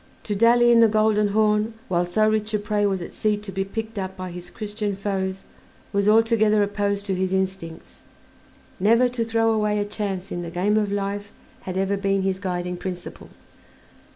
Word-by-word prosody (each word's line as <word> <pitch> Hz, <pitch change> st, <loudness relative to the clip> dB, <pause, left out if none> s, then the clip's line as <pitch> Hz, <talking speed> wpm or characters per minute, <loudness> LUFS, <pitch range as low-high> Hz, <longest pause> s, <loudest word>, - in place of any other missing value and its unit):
To 210 Hz, -, -3 dB
dally 240 Hz, +3 st, +5 dB
in 235 Hz, -, +6 dB
the 230 Hz, -, +7 dB
Golden 215 Hz, -1 st, +2 dB
Horn 210 Hz, +1 st, +1 dB
while 175 Hz, -1 st, 0 dB
so 215 Hz, +5 st, +2 dB
rich 215 Hz, 0 st, 0 dB
a -, -, +3 dB
prey 205 Hz, 0 st, 0 dB
was 190 Hz, -3 st, -1 dB
at -, -, -9 dB
sea 210 Hz, -1 st, 0 dB
to 210 Hz, -1 st, -8 dB
be 195 Hz, 0 st, -1 dB
picked 220 Hz, +2 st, -5 dB
up 190 Hz, 0 st, -5 dB
by 185 Hz, -1 st, -6 dB
his 175 Hz, 0 st, -8 dB
Christian 210 Hz, -1 st, -4 dB
foes 195 Hz, -1 st, -3 dB, 0.5 s
was 200 Hz, +1 st, +2 dB
altogether 220 Hz, -1 st, +4 dB
opposed 200 Hz, 0 st, -1 dB
to 195 Hz, -, -1 dB
his 185 Hz, 0 st, -1 dB
instincts: 190 Hz, -4 st, -4 dB, 0.8 s
never 230 Hz, +6 st, +4 dB
to 240 Hz, -1 st, -2 dB
throw 225 Hz, 0 st, +1 dB
away 210 Hz, -1 st, +1 dB
a 205 Hz, -, 0 dB
chance 200 Hz, -3 st, -4 dB
in 175 Hz, -, -3 dB
the 170 Hz, -, -5 dB
game 185 Hz, +5 st, 0 dB
of 210 Hz, -2 st, +1 dB
life 205 Hz, 0 st, -3 dB, 0.4 s
had 185 Hz, -, -3 dB
ever 195 Hz, +1 st, 0 dB
been 195 Hz, -1 st, 0 dB
his 190 Hz, -1 st, -1 dB
guiding 180 Hz, -2 st, -3 dB
principle. 180 Hz, -1 st, -7 dB
205 Hz, 190 wpm, -23 LUFS, 190-215 Hz, 0.8 s, the